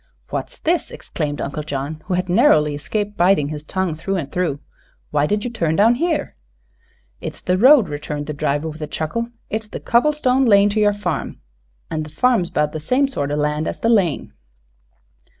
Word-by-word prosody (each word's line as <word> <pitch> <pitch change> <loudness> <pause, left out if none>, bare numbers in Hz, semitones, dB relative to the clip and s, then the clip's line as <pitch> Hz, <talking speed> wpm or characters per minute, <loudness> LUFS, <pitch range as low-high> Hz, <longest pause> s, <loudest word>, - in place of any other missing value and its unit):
"What's - - -4
this?" 340 +1 0
exclaimed 145 -3 -4
Uncle 145 +2 -3
John, 145 +1 -4
who 185 - -1
had 180 +1 -1
narrowly 175 - +4
escaped 205 +8 -3
biting 175 -5 +3
his 150 -1 -6
tongue 185 +1 -2
through 180 +5 -3
and 155 -7 -3
through. 170 -6 -1 0.5
"Why 150 0 +2
did 210 +3 0
you 245 - -3
turn 165 -9 0
down 215 +5 +5
here?" 320 - -1 0.8
"It's - - -7
the 180 - 0
road," 250 +3 +6
returned 145 0 -5
the 150 - -4
driver, 145 +1 -1
with 155 0 -7
a 150 - -3
chuckle; 160 +11 -3 0.2
"it's 220 0 -3
the - - -6
cobble 245 +6 +3
stone 265 -2 +2
lane 205 -3 +5
to 210 +2 0
yer 210 -1 +4
farm, 205 -3 -3 0.5
an' 155 - -1
the 155 - -6
farm's 220 +1 +2
'bout 150 0 0
the 155 - -5
same 255 - +2
sort 145 - -3
o' 145 - -1
land 150 +1 0
as - - -3
the 230 - 0
lane." 195 -10 +1
180 Hz, 195 wpm, -20 LUFS, 150-220 Hz, 0.8 s, road